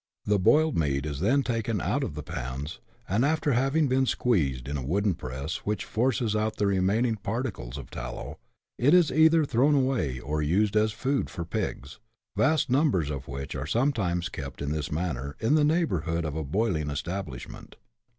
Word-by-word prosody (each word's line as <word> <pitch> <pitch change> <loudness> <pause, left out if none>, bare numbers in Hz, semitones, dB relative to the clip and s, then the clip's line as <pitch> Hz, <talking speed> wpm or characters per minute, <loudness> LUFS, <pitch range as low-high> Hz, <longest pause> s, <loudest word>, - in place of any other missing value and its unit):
The 105 -1 +2
boiled 155 - +4
meat 70 -3 0
is 70 -3 -4
then 130 - +3
taken 115 -3 -1
out - - 0
of - - -4
the 75 - -5
pans, 65 +5 -5 0.3
and, 105 +6 +1
after 150 0 +1
having 135 +5 +2
been 130 0 +2
squeezed 70 - +1
in 70 - -3
a 70 - -3
wooden 100 +8 +1
press, 70 +1 -5
which 105 0 -3
forces 120 -1 0
out 110 0 0
the 105 - +1
remaining 100 +4 +2
particles 100 - -4
of 65 -4 -9
tallow, - - -6 0.4
it 145 +8 +5
is 175 -3 +5
either 160 0 +5
thrown 135 +3 +3
away, 130 - 0
or 75 +4 -2
used 100 +8 +1
as 110 0 +3
food 135 +5 -1
for 85 - -5
pigs, 75 -1 -4 0.4
vast 155 +1 +2
numbers 125 - +2
of 70 - -5
which 70 +1 -5
are 70 0 -4
sometimes 95 - 0
kept 70 -6 -7
in 70 0 -2
this 75 0 -3
manner, 75 -4 -3
in 115 +6 +2
the 155 -1 +4
neighbourhood 90 - +1
of 75 -1 -3
a 80 - -2
boiling 80 -1 0
establishment. 75 -3 -6
100 Hz, 180 wpm, -27 LUFS, -, 0.4 s, it